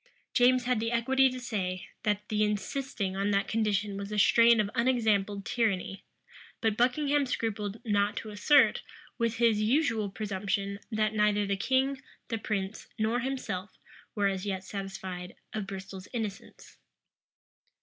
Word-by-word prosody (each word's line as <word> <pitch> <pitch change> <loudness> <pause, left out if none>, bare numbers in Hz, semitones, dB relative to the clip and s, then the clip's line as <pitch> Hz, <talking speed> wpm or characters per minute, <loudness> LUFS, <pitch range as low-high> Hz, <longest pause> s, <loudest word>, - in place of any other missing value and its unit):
James 250 0 +4
had 250 -2 +1
the 230 +1 -1
equity 265 +3 +3
to 255 0 -6
say, 185 -7 -3 0.2
that 210 -1 -1
the 215 0 +2
insisting 210 -1 -2
on 200 +1 0
that 200 -1 +1
condition 210 -2 0
was 200 +1 -6
a 210 - -2
strain 230 +2 +6
of 210 - +2
unexampled 215 -5 +1
tyranny: 195 -5 -1 0.6
but 220 -3 +1
Buckingham 280 +4 +2
scrupled 215 -3 -2
not 205 -1 +1
to 215 - -5
assert, 250 +8 +4 0.4
with 230 -1 +1
his 230 -3 +3
usual 225 -3 +2
presumption, 200 0 -2
that 215 0 +1
neither 210 -1 +2
the 200 0 0
king, 265 +5 +1 0.3
the 225 -2 -2
prince, 200 -1 -3
nor 220 +2 +1
himself, 245 -7 -4 0.4
were 205 -2 +1
as 195 -1 0
yet 190 -2 -3
satisfied 190 -2 -6 0.2
of 210 -3 -3
Bristol's 190 -1 -7
innocence. 215 -5 -6
210 Hz, 145 wpm, -29 LUFS, 200-235 Hz, 0.6 s, strain